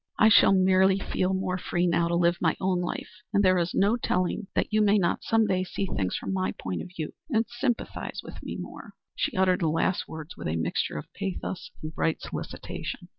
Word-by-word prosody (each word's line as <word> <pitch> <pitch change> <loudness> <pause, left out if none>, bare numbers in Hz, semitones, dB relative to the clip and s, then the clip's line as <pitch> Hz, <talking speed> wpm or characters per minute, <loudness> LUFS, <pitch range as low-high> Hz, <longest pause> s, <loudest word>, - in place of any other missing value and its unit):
I 220 - +6
shall 215 - +7
merely 190 0 +5
feel 190 -1 0
more 185 -1 -1
free 175 0 0
now 170 -1 +2
to 170 - 0
live 170 0 +3
my 160 -3 +2
own 185 -1 +1
life 175 - -5
and 200 -1 +3
there 185 -1 +5
is 170 0 -1
no 205 +4 +3
telling 185 -1 -1
that - - 0
you 215 - +4
may 210 0 +5
not 175 -4 +1
some 225 -1 +3
day 185 -2 +1
see 185 +2 -3
things 95 - -2
from 95 - -4
my 95 0 0
point 90 -2 -4
of - - -8
view 155 -2 -4 0.2
and 225 -4 +2
sympathize 240 0 -3
with - - -10
me - - -5
more." - - -8 0.2
She 285 -9 -1
uttered 185 -1 +3
the 165 - +1
last 165 +4 0
words 160 +2 -8
with - - -5
a 80 - -1
mixture 80 -2 -1
of 75 - -8
pathos 190 -1 -4
and 155 +1 -5
bright 160 0 0
solicitation. - - -6
185 Hz, 220 wpm, -27 LUFS, 170-200 Hz, 0.2 s, shall